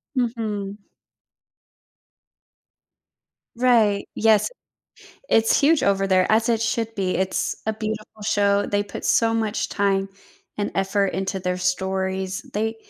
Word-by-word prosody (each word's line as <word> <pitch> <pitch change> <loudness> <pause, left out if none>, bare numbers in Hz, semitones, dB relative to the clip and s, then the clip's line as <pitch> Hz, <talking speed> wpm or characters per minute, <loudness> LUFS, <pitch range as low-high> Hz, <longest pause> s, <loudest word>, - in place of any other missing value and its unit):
Mhm. 215 -5 -2 2.8
Right, 230 -5 +3
yes, 220 -1 +3 0.8
it's 225 0 +4
huge 300 +2 +4
over 195 0 +2
there 185 -1 +3
as 225 +1 +3
it 225 -1 +1
should 225 0 -1
be, 190 -2 -1
it's 190 +1 -1
a 220 - +1
beautiful 215 0 -6
show, 200 0 +2
they 205 0 0
put 205 - -8
so 225 -1 +3
much 220 -1 -1
time 195 -1 0 0.5
and 205 - -2
effort 195 +1 +1
into 190 +1 -2
their 180 0 -2
stories, 190 +1 -2
they 220 +2 -1
205 Hz, 120 wpm, -23 LUFS, 195-225 Hz, 2.8 s, it's